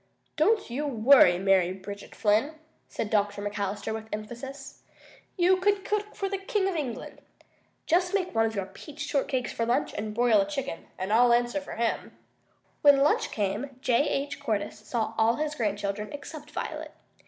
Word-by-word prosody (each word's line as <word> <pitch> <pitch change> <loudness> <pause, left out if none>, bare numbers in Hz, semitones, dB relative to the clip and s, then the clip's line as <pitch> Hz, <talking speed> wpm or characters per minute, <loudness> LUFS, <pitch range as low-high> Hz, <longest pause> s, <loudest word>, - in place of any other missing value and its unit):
"Don't 400 - +2
you 290 +5 -2
worry, 235 -7 +6
Mary 190 -1 +3
Bridget 200 +1 -9
Flynn," 225 +9 +2 0.3
said 210 - -4
Dr. 205 -1 +1
McAllister 205 +1 -3
with 220 0 -6
emphasis. 265 +6 -7 0.6
"You 365 +1 +4
could 395 +1 +1
cook 420 0 -2
for 390 - -2
the 390 0 -3
King 390 0 0
of 385 - -1
England! 275 -7 -5 0.6
Just 355 +1 +2
make 365 -2 -1
one 225 0 +3
of 220 - -5
your 195 -2 -1
peach 300 - -12
shortcakes 270 -4 -1
for 230 - -1
lunch 245 +5 0
and 210 0 -4
broil 235 -3 +4
a 195 - -1
chicken, 275 - -4
and 190 +3 -2
I'll 240 +2 +6
answer 240 +4 +2
for 285 - -8
him." 230 0 -2 0.6
When 285 -1 +7
lunch 295 - +2
time - - -9 0.3
came 265 -2 -21
J. 255 +3 +2
H. 280 0 -2
Cordyce 210 -2 -2
saw 225 -2 -1
all 225 +1 +4
his 300 0 -2
grandchildren 210 -4 -2
except 295 +1 -8
Violet. - - -5
245 Hz, 175 wpm, -28 LUFS, 210-300 Hz, 0.6 s, When